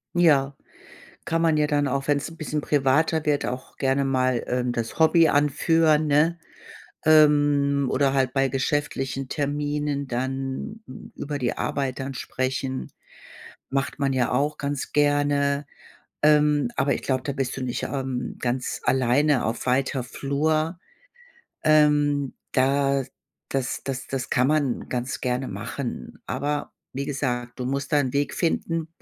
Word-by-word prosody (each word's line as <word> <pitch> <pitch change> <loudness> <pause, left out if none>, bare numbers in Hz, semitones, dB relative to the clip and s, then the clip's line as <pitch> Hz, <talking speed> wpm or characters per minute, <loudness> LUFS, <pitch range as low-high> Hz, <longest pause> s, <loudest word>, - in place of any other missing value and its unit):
Ja, 140 -5 +3 0.7
kann 165 0 0
man 160 -2 +3
ja 150 0 +2
dann 145 -1 +1
auch, 135 +1 -2
wenn's 145 +2 +1
'n 165 - -13
bisschen 155 -1 -3
privater 150 +3 +2
wird, 145 -1 +1
auch 125 +1 -6
gerne 135 0 +1
mal, 130 -2 +1
ähm, 125 0 0
das 115 -1 -4
Hobby 160 0 +5
anführen, 155 +2 +3
ne? 160 +4 +3 0.7
Ähm, 145 -3 +4
oder 135 0 +2
halt 130 -2 +1
bei 135 0 +2
geschäftlichen 135 0 -2
Terminen 145 0 -2
dann 135 - -3 0.3
über 145 0 -4
die 125 -3 -2
Arbeit 135 -2 -2
dann 135 +1 -4
sprechen, 130 +1 -3 0.8
macht 135 0 -1
man 135 -1 0
ja 125 -2 +1
auch 145 +4 0
ganz 140 -1 -3
gerne. 145 -1 +2 0.6
Ähm, 150 +2 +4
aber 140 +1 +2
ich - - -3
glaube, 130 -1 -1
da 140 - -2
bist 135 -2 -2
du 135 - -5
nicht, 125 -1 -3
ähm, 130 -2 -3
ganz 125 +1 -2
alleine 130 +2 +2
auf 115 +3 -3
weiter 130 0 +1
Flur. 155 +6 -1 0.9
Ähm, 145 -2 +3 0.2
da 135 +1 +2 0.5
das 135 -2 -2
das 130 -1 -4
das 135 -2 -3
kann 125 +1 +2
man 145 -4 0
ganz 125 +1 -3
gerne 125 +1 -2
machen. 115 - -6
Aber 145 0 -2 0.2
wie 140 +1 -3
gesagt, 125 -3 -3
du 125 - -2
musst 140 +2 -2
da 150 - +4
'n 130 -2 -1
Weg 145 0 0
finden, 165 -1 -1
140 Hz, 145 wpm, -24 LUFS, 130-150 Hz, 0.9 s, Hobby